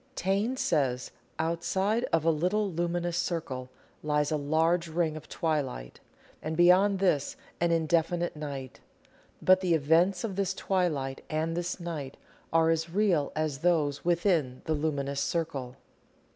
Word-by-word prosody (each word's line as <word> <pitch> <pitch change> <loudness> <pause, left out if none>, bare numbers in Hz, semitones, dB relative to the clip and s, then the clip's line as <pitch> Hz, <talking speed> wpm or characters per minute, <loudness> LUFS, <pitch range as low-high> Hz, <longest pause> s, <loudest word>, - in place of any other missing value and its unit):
Taine 200 +8 0
says: 130 - 0 0.3
"Outside 190 +7 0
of 165 -1 +2
a 165 - +5
little 185 +6 0
luminous 175 0 -1
circle, 130 -7 -3 0.3
lies 150 -1 0
a - - +2
large 160 +4 +1
ring 160 -1 0
of 155 0 -10
twilight, 140 - -2 0.4
and 155 +1 -4
beyond 185 +3 +5
this 180 -7 +1 0.2
an 170 - +2
indefinite 170 +1 +1
night; 140 -4 -6 0.6
but 185 0 +5
the 175 -3 +2
events 165 +5 +3
of 200 -4 -4
this 195 -1 0
twilight 155 -10 -1
and 160 +1 -1
this 175 +2 -3
night 155 -6 -5 0.3
are 165 0 +4
as 165 0 -1
real 180 -6 +1
as 155 -3 -1
those 150 -4 +1
within 170 -7 +1
the 160 - 0
luminous 140 -2 -1
circle." 140 -7 -2
165 Hz, 140 wpm, -29 LUFS, 150-175 Hz, 0.6 s, a